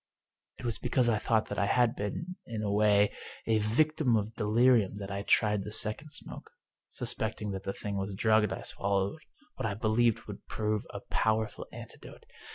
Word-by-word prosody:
It - - -8
was 115 -2 -2
because 125 -1 +2
I 110 -2 +2
thought 110 0 +2
that 105 - -2
I 100 - +2
had 120 +2 +3
been, 165 - -4
in 110 -2 -4
a 100 - 0
way, 105 0 +4 0.3
a 110 -1 +3
victim 125 +3 +2
of 105 +1 -2
delirium 110 -1 +3
that 100 -1 -6
I 100 0 -2
tried 105 0 +3
the 105 +2 -6
second 110 +8 -2
smoke. 150 - -4 0.4
Suspecting 110 -1 -2
that 95 0 -5
the 95 - -2
thing 100 -1 -4
was 95 0 -3
drugged 110 0 +3
I - - -4
swallowed 100 +7 -1 0.4
what - - -1
I 100 - -2
believed 110 +1 +2
would - - -10
prove 105 -1 -1
a - - -7
powerful 110 0 0
antidote. - - -11
110 Hz, 180 wpm, -30 LUFS, 100-115 Hz, 0.4 s, way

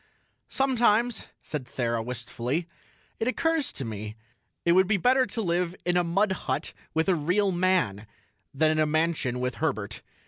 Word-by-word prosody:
"Sometimes," 240 -4 +2 0.2
said 150 -4 -4
Thera 115 -2 -1
wistfully, 125 +6 -3 0.5
"it 225 - 0
occurs 315 +4 +1
to 135 - -5
me 110 -1 -5 0.5
it 170 - +5
would 185 +2 +5
be 205 0 +3
better 255 +5 +3
to 225 - -3
live 175 0 0
in 175 0 +1
a 180 - +4
mud 190 +4 +2
hut 190 - -2 0.2
with 160 +2 +2
a 190 - +4
real 180 +5 +1
man 175 - +1 0.4
than 155 +3 +3
in 155 - 0
a 155 - +3
mansion 155 -5 0
with 125 0 -2
Herbert." 110 -9 -2
170 Hz, 165 wpm, -27 LUFS, 125-200 Hz, 0.5 s, it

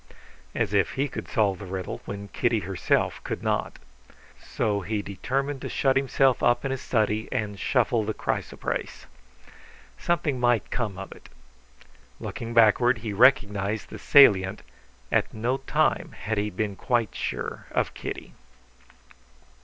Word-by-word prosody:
(As 100 - 0
if 100 -4 +2
he 140 +2 0
could - - -7
solve 100 -4 +1
the 100 - -8
riddle 95 0 -5
when 100 0 -6
Kitty 120 -3 0
herself 95 -1 0
could - - -4
not!) - - -1 0.7
So 105 -3 -1
he 105 +2 -2
determined 135 +8 -3
to - - -5
shut 135 -1 +2
himself 135 -1 +2
up 120 +2 +2
in 135 - -1
his 135 - -3
study 110 -2 0
and 105 -6 -3
shuffle 120 -3 +1
the 110 +1 -3
chrysoprase. - - -3 0.9
Something 150 -6 0
might 120 -2 +1
come 105 -6 -2
of 95 0 -7
it. - - -13 0.9
Looking 110 +3 -6
backward, 115 +2 +5
he 105 - -2
recognized 105 -3 +3
the - - -8
salient, 100 -8 +5 0.5
at - - +1
no 120 +4 0
time 135 - 0
had 110 -1 -2
he 105 +1 -1
been 105 +1 -3
quite 120 0 0
sure - - -4
of - - -1
Kitty. - - -7
110 Hz, 145 wpm, -26 LUFS, 100-125 Hz, 0.9 s, backward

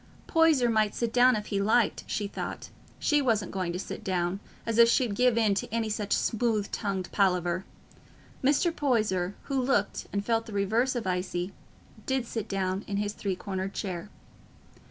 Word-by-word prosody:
Poyser 325 -7 +4
might 215 -2 +2
sit 235 -1 -1
down 250 +1 +6
if 210 -1 -3
he 200 -1 -1
liked, 220 +2 +2
she 205 - -2
thought; - - -6 0.3
she 295 -1 +2
wasn't 225 -7 +1
going 185 -3 -2
to 175 - -3
sit 185 - -6
down, 180 0 -1 0.3
as 230 0 0
if 230 0 +8
she'd 240 -3 +2
give 245 +2 +3
in 220 -3 +3
to 195 - -3
any 225 -1 -1
such 210 -1 -1
smooth 220 -3 0
tongued 195 -4 -2
palaver. 180 -2 +1 0.8
Mr. 300 +5 +3
Poyser, 210 -9 +1
who 270 -2 -1
looked 245 -6 0
and 200 0 -2
felt 225 0 0
the 220 - -8
reverse 220 +6 +1
of 240 - -2
icy, 180 0 -2 0.5
did 265 -2 0
sit 225 -2 -4
down 190 0 -1
in 200 - -2
his 205 0 -1
three 195 -3 -2
cornered 190 0 -4
chair. 185 -1 -4
210 Hz, 175 wpm, -28 LUFS, 195-235 Hz, 0.8 s, if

